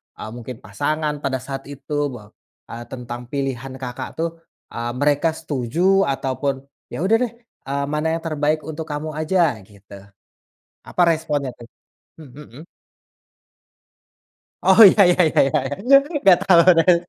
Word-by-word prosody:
eee, - - -8
mungkin 120 +1 -8
pasangan 150 0 -2
pada 135 -2 -2
saat 135 0 -7
itu 145 +1 -3
bahwa, 105 -4 -12 0.4
eee, 120 +1 -7
tentang 120 -1 -7
pilihan 135 -1 -4
Kakak 130 0 -6
tuh, 165 +1 -1 0.4
eee, 120 0 -4
mereka 145 +4 +1
setuju 170 +9 0
ataupun, 135 0 -2 0.2
"Ya 160 - -5
udah 205 +4 +3
deh, 235 -2 -4 0.3
eee, 140 +1 -2
mana 150 +1 -1
yang 165 - -6
terbaik 155 -1 -1
untuk 160 +1 -7
kamu 150 +1 -4
aja," 155 -6 +1
gitu. 100 -1 -16 0.9
Apa 180 - 0
responnya 150 -4 -1
tuh? 120 - -12 0.5
Mhm. 150 -1 -13 2.0
Oh 190 +4 +6
iya 200 - +3
iya 180 - +2
iya - - 0
iya 135 - +1 0.3
iya 275 +2 +6 0.3
nggak 190 -3 +6
tahu 175 -3 +6 0.2
kan. 175 +2 +5
145 Hz, 140 wpm, -21 LUFS, 130-160 Hz, 2.0 s, Oh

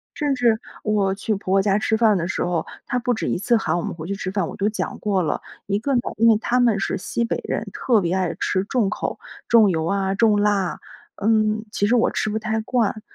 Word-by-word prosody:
甚 290 -3 0
至 235 -3 +2 0.2
我 200 -3 +1
去 210 +2 -2
婆 190 -1 -3
婆 195 - +5
家 200 0 +2
吃 220 - +1
饭 220 -2 +4
的 170 -1 -2
时 190 - -2
候， 175 -2 -1 0.2
她 245 - 0
不 245 0 0
止 220 - -3
一 - - 0
次 235 +6 +2
喊 220 - 0
我 - - -1
们 - - -4
回 160 -1 -7
去 200 +3 -3
吃 190 -2 -4
饭， 190 -4 -1
我 - - -8
都 200 - +1
讲 215 - -3
过 200 -3 0
了， 160 - -1 0.3
一 200 0 0
个 275 +5 -1
呢， 240 - +3 0.2
因 230 +2 +4
为 225 - +6
他 240 +3 0
们 230 -5 +3
是 - - -1
西 235 +4 -2
北 230 - -1
人， - - -2
特 230 -5 +2
别 175 -1 -1
爱 185 -3 0
吃 190 +1 0
重 225 -3 +1
口， - - -3 0.3
重 225 -3 +6
油 160 -3 0
啊、 195 +1 0
重 215 0 +3
辣， 205 -3 +1 0.4
嗯， 215 0 +2
其 205 - 0
实 240 - +3
我 235 - +3
吃 - - -1
不 215 - -1
太 220 0 -1
惯， 220 -1 0
210 Hz, 270 characters per minute, -22 LUFS, 195-225 Hz, 0.4 s, 为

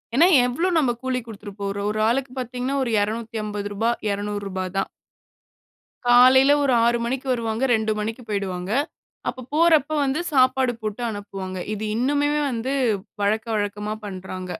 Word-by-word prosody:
ஏன்னா 330 +6 +6 0.2
எவ்ளோ 265 +9 0
நம்ப 275 -6 +3
கூலி 260 -1 -1
குடுத்துட 210 -2 -9
போறோம். 200 +1 -2
ஒரு 215 - -3
ஆளுக்கு 255 +1 -1
பார்த்தீங்கன்னா 250 +2 -3
ஒரு 240 - -2
ரூ.250 215 -1 -2 0.2
ரூ.200 200 -2 -3
தான். 195 - 0 1.2
காலைல 255 +3 +7
ஒரு 275 - +2
6:00 235 0 +3
மணிக்கு 260 +3 -3
வருவாங்க. 230 0 -2
2:00 220 -1 +1
மணிக்கு 225 +4 -4
போயிடுவாங்க. 190 -2 -3 0.6
அப்ப 255 -2 -5
போறப்ப 315 -3 +4
வந்து 270 +5 0
சாப்பாடு 260 -1 +3
போட்டு 215 +2 -4
அனுப்புவாங்க. 195 -3 -6
இது 215 0 -4
இன்னுமே 285 +4 +1 0.2
வந்து 245 +4 -2 0.5
வழக்க, 215 +3 +1
வழக்கமா 210 +1 -2
பண்றாங்க. 185 -1 -6
225 Hz, 135 wpm, -23 LUFS, 205-255 Hz, 1.2 s, காலைல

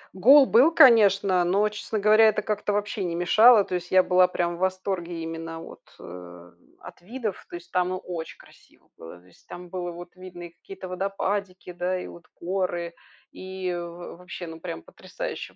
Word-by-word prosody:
Гол 270 +9 +7
был, 260 +6 +5
конечно, 200 - +5
но, 200 +4 +2
честно 210 +1 -5
говоря, 215 +2 +5
это 210 -1 0
как-то 210 -1 -2
вообще 205 0 -2
не 170 -2 -3
мешало. 215 +6 +5
То 185 - -8
есть, 180 0 -5
я 185 0 +5
была 180 0 +4
прям 175 -1 -2
в - - -13
восторге 185 -2 -3
именно 165 0 -7
от, - - -12 0.2
э, 90 0 -12 0.3
от - - -13
видов. 220 0 -6
То - - -8
есть, 170 0 -11
там, 180 0 0
ну, 185 - -3
очень 170 -3 -7
красиво - - -22
было. 80 +2 -12
То 90 - -25
есть 90 - -24
там 175 0 -10
было 175 -1 -6
видно 185 -1 -11
и 175 - -8
какие-то 190 +3 -11
водопадики, 195 0 -4
да, 180 +1 -3
и - - -7
вот 170 - -13
горы, 175 -2 -3 0.4
и 185 -1 -6
в 175 0 -8
вообще, 180 0 -9
ну, 160 -1 -10
прям 80 - -7
потрясающе - - -8
180 Hz, 185 wpm, -25 LUFS, 175-200 Hz, 0.4 s, Гол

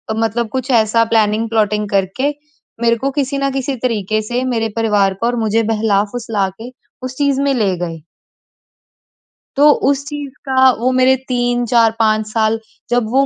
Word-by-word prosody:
मतलब 225 +1 -1
कुछ 260 +2 -4
ऐसा 230 0 +3
प्लानिंग-प्लॉटिंग 215 -1 +1
करके 200 +8 0 0.5
मेरे 235 0 +3
को 275 +4 -1
किसी 280 0 -2
न 275 0 0
किसी 270 0 -2
तरीके 215 -3 0
से, 240 +4 -2
मेरे 225 -3 -1
परिवार 210 -4 +2
पर 240 +1 +1
मुझे 225 0 +1
बहला-फुसला 215 -1 0
के 245 +2 -8 0.3
उस 255 0 -5
चीज़ 280 -1 +1
में 280 0 +1
ले 205 -7 +1
गए। 165 -2 -5 1.6
तो 295 +1 +7 0.2
उस 280 0 0
चीज़ 290 -2 -5 0.2
का 260 0 +5
वो 250 +2 +1
मेरे 255 +1 +4
3, 245 -1 0
4, 230 -1 +3
5 215 -1 +2
साल 225 0 +1 0.3
जब 245 0 +2
वो 270 +1 +3
230 Hz, 160 wpm, -17 LUFS, 215-260 Hz, 1.6 s, तो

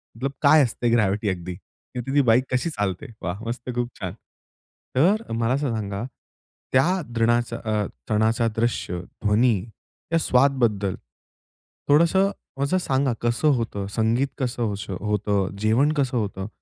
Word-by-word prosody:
मतलब 130 +4 -2
काय 155 +1 +7
असते 120 -1 -1
ग्रॅव्हिटी 105 -2 +2
अगदी, 90 -1 -4 0.4
तिथे 125 +2 -3
ती 145 - +6
बाईक 125 -1 +4
कशी 125 +7 +1
चालते, 105 - -3
वाह! 95 +4 -4
मस्त 120 +2 -5
खूप 120 0 -1
छान! 90 -3 -4 0.8
तर 195 - +2
मला 115 +2 +1
असं 140 -3 0
सांगा, 100 -1 -3 0.7
त्या 175 +9 +3
द्रनाचा, 120 0 +1
अ, 105 -1 0 0.2
सणाचा 110 +2 +2
दृश्य, 115 -6 -1 0.2
ध्वनी 110 +3 +4 0.6
या - - +5
स्वाद 135 -2 +4
बद्दल 105 -5 +1 0.9
थोडंसं 170 +6 +4 0.3
असं 165 +7 +1
सांगा 135 -6 +1
कसं 120 +6 +1
होतं? 110 -4 -3
संगीत 115 +4 +2
कसं 120 -4 -1
अश 100 +1 -7
होतं? 100 +1 0
अ, - - -6
जेवण 115 +8 +3
कसं 135 -4 0
होतं? 100 -3 -3
115 Hz, 145 wpm, -24 LUFS, 105-135 Hz, 0.9 s, काय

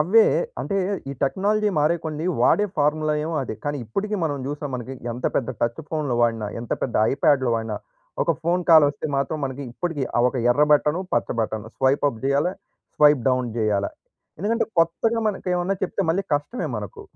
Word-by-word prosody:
అవ్వే 210 +8 +6 0.4
అంటే, 200 - -2 0.3
ఈ - - -3
టెక్నాలజీ 210 +8 +1
మారే 155 +4 +3
కొంది. 155 0 -3 0.2
వాడే 210 - +4
ఫార్ములా 150 +1 +1
ఏమో 165 0 -3
అదే. 120 - -5
కానీ 145 0 -1
ఇప్పటికి 205 - -2
మనం 145 -2 -1
జూసాం. 145 0 -4
మనకి 125 +2 -5 0.2
ఎంత 125 - -3
పెద్ద 130 -1 0
టచ్ 120 +6 0
ఫోన్‌లు 150 -6 -1
వాడినా, 115 -2 +1
ఎంత 120 - -4
పెద్ద 125 - -2 0.2
ఐప్యాడ్‌లు 135 -4 +3
వాడినా. 115 0 -2 0.5
ఒక 165 - +2
ఫోన్ 175 +2 +1
కాల్ 160 -2 +9
వస్తే 145 +2 -4
మాత్రం. 140 +3 -1
మనకి 135 +1 -4
ఇప్పటికి 160 -1 -2
ఆ - - +5
ఒక 130 - -5 0.2
ఎర్ర 150 +4 +4
బటను, 150 +3 +3
పచ్చ 120 - +1
button, 110 0 -3
swipe 135 +2 +2
up 110 -3 -11
జేయాలా, 140 +6 +2 0.4
swipe 150 -4 +5
down 125 -1 +1
జేయాలా. 105 -2 +1 0.5
ఎందుకంటే, 230 +2 +1
కొత్తగా 225 +8 +1
మనకు 195 -3 -4
ఏమన్నా 180 +2 0
చెప్తే 195 - -3
మళ్ళీ 185 +4 +1
కష్టమే 150 - -2
మనకు. 435 -3 -7
150 Hz, 180 wpm, -23 LUFS, 130-175 Hz, 0.5 s, కాల్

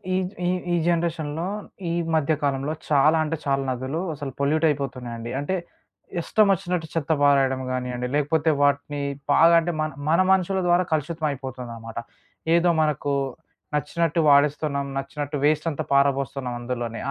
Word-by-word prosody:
ఈ - - +2 0.3
ఈ - - +2 0.2
ఈ - - +4
జనరేషన్‌లో 165 -2 -1 0.4
ఈ - - -1 0.2
మధ్య 155 0 +2
కాలంలో 140 +1 0 0.2
చాలా 150 +2 +5
అంటే 160 +1 -2
చాలా 135 -1 +1
నదులు 130 +5 -3
అసలు 140 -2 -6
పొల్యూట్ 155 +3 +2
అయిపోతున్నాయండి. 125 -5 -4
అంటే, 145 +7 -1 0.7
ఇష్టమొచ్చినట్టు 180 -4 +1
చెత్త 165 -1 -1
పారెయడం 135 -2 +3
గానియండి, 125 -1 -2
లేకపోతే 150 +2 +1
వాటిని 145 0 +1 0.3
బాగా 165 +3 +6
అంటే 170 +1 -1
మన 155 - 0 0.2
మన 165 - +4
మనుషుల 190 0 +2
ద్వారా 175 +1 +4
కలుషితమయిపోతుందనమాట. 130 -7 -4 0.6
ఏదో 170 +1 +4
మనకు 150 -2 0 0.6
నచ్చినట్టు 165 +3 0
వాడేస్తున్నాం. 140 0 +3
నచ్చినట్టు 145 +1 -4
వేస్టంతా 155 0 +1
పారబోస్తున్నాం 135 -2 +1
అందులోనే, 120 -2 -4
145 Hz, 125 wpm, -24 LUFS, 135-160 Hz, 0.7 s, బాగా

